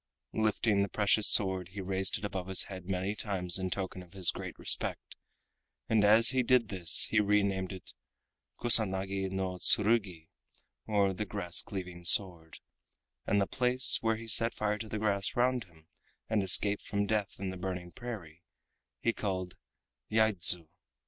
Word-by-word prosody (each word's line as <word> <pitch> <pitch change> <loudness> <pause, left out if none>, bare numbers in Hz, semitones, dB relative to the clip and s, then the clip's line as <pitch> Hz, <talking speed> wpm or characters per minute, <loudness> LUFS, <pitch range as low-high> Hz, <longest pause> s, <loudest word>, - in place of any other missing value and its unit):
Lifting 110 -1 0
the 100 - -2
precious 105 0 +2
sword 95 -3 +2
he 100 - -8
raised 95 0 -1
it - - -8
above 95 -3 -6
his 95 -1 +4
head 95 -2 -11
many 95 +2 -3
times 95 -4 -1
in 95 0 -4
token 95 0 -5
of 90 0 -17
his 95 -3 +1
great - - -9
respect, - - -3 0.7
and 110 -2 +1
as 110 +3 +5
he 130 -1 0
did 125 -3 +1
this 90 -5 +3
he 110 - +2
re 105 0 +1
named 95 -1 -3
it 95 -2 -10 0.7
Kusanagi 95 -4 +4
no 95 -1 -5
Tsurugi 100 -8 0 0.6
or 100 -3 0
the 105 - -5
Grass 90 -3 -3
Cleaving 90 -3 -9
Sword, 85 -3 +3 0.7
and 100 - +1
the 100 - +1
place 125 +4 +4
where 115 0 0
he 115 +1 -10
set 115 +1 +2
fire 105 0 -3
to 110 0 -8
the 110 - -5
grass 100 -2 -1
round 125 -2 0
him 80 -3 -24 0.4
and 110 -2 -1
escaped 100 +2 +3
from 100 0 -3
death 105 -2 -3
in 95 -1 -5
the - - -9
burning 90 -1 -7
prairie, 90 -10 -10 0.6
he 115 - -1
called 95 -4 -5 0.5
Yaidzu. 95 -7 +2
100 Hz, 165 wpm, -29 LUFS, 95-110 Hz, 0.7 s, as